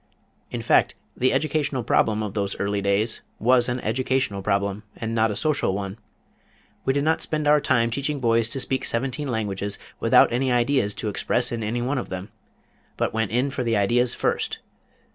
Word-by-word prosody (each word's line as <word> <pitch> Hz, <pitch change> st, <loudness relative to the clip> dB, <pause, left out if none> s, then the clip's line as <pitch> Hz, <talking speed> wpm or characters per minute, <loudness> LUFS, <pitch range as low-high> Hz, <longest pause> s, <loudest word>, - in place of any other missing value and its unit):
In -, -, -5 dB
fact, -, -, +3 dB, 0.2 s
the 130 Hz, +1 st, +2 dB
educational 145 Hz, -2 st, 0 dB
problem 110 Hz, -1 st, +2 dB
of 105 Hz, -2 st, -4 dB
those 100 Hz, -2 st, -2 dB
early 100 Hz, 0 st, -1 dB
days 100 Hz, +3 st, +1 dB, 0.2 s
was 120 Hz, +1 st, +3 dB
an 125 Hz, +1 st, -1 dB
educational 125 Hz, -3 st, -1 dB
problem 100 Hz, 0 st, -1 dB
and 115 Hz, 0 st, -4 dB
not 110 Hz, 0 st, +2 dB
a 105 Hz, -, -3 dB
social 145 Hz, -8 st, 0 dB
one. 100 Hz, +1 st, -5 dB, 0.9 s
We 135 Hz, -, +3 dB
did 140 Hz, +1 st, 0 dB
not 160 Hz, +1 st, +1 dB
spend 155 Hz, -1 st, 0 dB
our 150 Hz, 0 st, +6 dB
time 115 Hz, -3 st, +2 dB
teaching 140 Hz, +4 st, -2 dB
boys 115 Hz, -2 st, +2 dB
to 135 Hz, -, -1 dB
speak 130 Hz, 0 st, +1 dB
seventeen 130 Hz, +4 st, -1 dB
languages, 105 Hz, -4 st, -2 dB, 0.2 s
without -, -, +5 dB
any 130 Hz, +1 st, +1 dB
ideas 120 Hz, -3 st, +2 dB
to 110 Hz, -, -4 dB
express 120 Hz, +4 st, 0 dB
in 120 Hz, -1 st, -3 dB
any 115 Hz, +3 st, -2 dB
one 130 Hz, +2 st, 0 dB
of -, -, -6 dB
them, 95 Hz, +1 st, -6 dB, 0.7 s
but -, -, -1 dB
went 110 Hz, -2 st, 0 dB
in 125 Hz, +6 st, 0 dB
for 130 Hz, -, -2 dB
the 115 Hz, -2 st, +1 dB
ideas 120 Hz, +5 st, +2 dB
first. -, -, -1 dB
115 Hz, 185 wpm, -24 LUFS, 105-130 Hz, 0.9 s, our